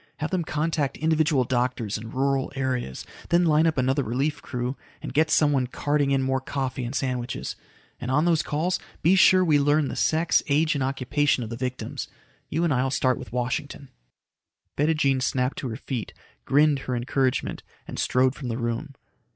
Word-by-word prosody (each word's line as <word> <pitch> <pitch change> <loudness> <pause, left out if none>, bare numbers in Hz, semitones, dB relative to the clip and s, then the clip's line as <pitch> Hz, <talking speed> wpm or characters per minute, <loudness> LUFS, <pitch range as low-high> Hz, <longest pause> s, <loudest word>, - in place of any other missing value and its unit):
Have 155 0 -3
them 185 -2 0
contact 155 -2 -1
individual 155 -3 +2
doctors 120 -3 -1
in 110 +1 -6
rural 135 +2 0
areas. 130 - -2 0.2
Then 175 +1 +4
line 155 0 +4
up 160 - 0
another 130 +2 +2
relief 135 +5 -1
crew, 125 +1 -3 0.2
and - - -7
get 155 +3 +3
somebody 145 -5 +3
carting 145 +2 0
in 135 -1 +2
more 130 0 0
coffee 130 -1 -3
and 120 +3 -4
sandwiches. 125 -3 -3 0.4
And 120 - -5
on 150 +5 +2
those 165 -3 +3
calls, 165 +5 -1 0.2
be 170 +4 +5
sure 185 -1 +6
we 150 -3 +4
learn 145 0 +2
the - - -5
sex, 160 +2 +2
age, 155 +4 +3
and 140 -3 -1
occupation 135 0 +1
of 115 - -7
the - - -3
victims. 125 +1 -4 0.4
You 160 +3 0
and 165 -4 +2
I'll 130 +1 +1
start 130 -1 +1
with 125 - -9
Washington." 125 +3 -3 0.9
Bettijean 145 -3 +2
snapped 125 +1 0
to 130 - -4
her 110 - -4
feet, 125 -5 -5 0.3
grinned 145 0 +4
her 130 -1 -3
encouragement 130 +1 -1 0.3
and - - -6
strode 130 0 +2
from 135 -2 -7
the 115 -1 -2
room. 120 +4 -3
135 Hz, 180 wpm, -25 LUFS, 125-150 Hz, 0.9 s, sure